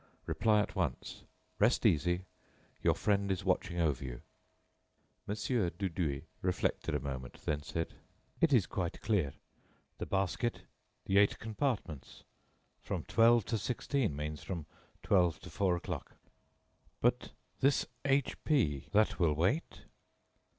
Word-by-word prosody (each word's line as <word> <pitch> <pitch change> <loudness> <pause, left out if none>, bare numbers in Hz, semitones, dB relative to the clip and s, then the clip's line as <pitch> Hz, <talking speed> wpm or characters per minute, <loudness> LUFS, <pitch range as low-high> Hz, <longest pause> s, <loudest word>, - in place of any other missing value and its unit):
Reply 105 -2 +3
at - - -4
once. - - -2 0.4
Rest 115 +4 +3
easy; 90 -1 +3 0.6
your - - +3
friend 100 -1 +1
is 95 - -2
watching 85 - 0
over 75 -5 +1
you." - - -6 1.1
Mon. 105 - -1
Dudouis 90 - -1 0.2
reflected 90 0 0
a - - +1
moment, 65 -2 -6
then 75 -1 0
said: 80 +3 -3 0.5
"It 165 - +4
is 120 -8 +5
quite 90 -3 -3
clear.... 95 -11 +1 0.7
the - - -3
basket.... 100 +5 0 0.4
the 100 +1 +4
eight 100 - +4
compartments.... 110 - -3 0.6
From - - -3
twelve 115 -1 +5
to 115 -2 -1
sixteen 120 - -1
means 75 +1 -4
from 85 -5 -5 0.4
twelve 90 -5 +3
to - - -10
four 95 -3 +2
o'clock." 85 - -5 0.8
"But 125 +1 +1 0.3
this 140 0 +3 0.2
H 135 -1 +1
P, 75 - +1
that 105 0 +3
will 85 -4 +4
wait?" 95 - 0
95 Hz, 130 wpm, -33 LUFS, 80-115 Hz, 1.1 s, is